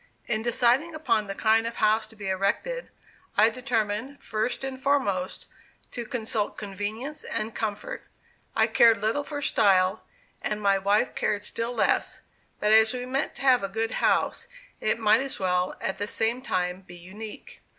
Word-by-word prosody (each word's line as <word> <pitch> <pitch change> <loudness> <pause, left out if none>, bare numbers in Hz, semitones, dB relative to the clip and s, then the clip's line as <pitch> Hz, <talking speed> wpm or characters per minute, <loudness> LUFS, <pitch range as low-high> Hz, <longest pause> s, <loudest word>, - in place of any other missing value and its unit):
In 215 -1 0
deciding 245 +7 +2
upon 230 -9 0
the 195 - -5
kind 225 +2 +3
of 230 - -5
house 215 +1 +2
to 220 - -15
be 205 -2 -7
erected, 200 - -1 0.5
I 220 +2 +6
determined, 240 +1 -2
first 220 +4 -2
and 265 -1 -5
foremost, 205 -10 0 0.5
to 240 -2 -5
consult 220 -3 -2
convenience 215 +8 -5
and 215 +1 -3
comfort. 210 -2 -4 0.5
I 220 - +4
cared 230 0 +5
little 220 +8 0
for 290 0 -5
style, 190 -3 +3 0.4
and 210 0 -2
my 200 -1 +3
wife 200 +2 +2
cared 205 0 -1
still 230 +3 -3
less; - - 0 0.4
but 210 - +2
as 220 +1 +6
we 250 0 -4
meant 265 +2 -2
to - - -8
have 260 -2 +5
a 195 - -3
good 225 +3 -2
house, - - +1 0.3
it 215 - +1
might 220 +2 +4
as 270 -1 -4
well, 180 -1 0
at 190 - -3
the 205 - -2
same 230 +4 0
time, 180 -6 -1
be 175 -2 -13
unique. 205 +5 -10
220 Hz, 170 wpm, -26 LUFS, 205-245 Hz, 0.5 s, I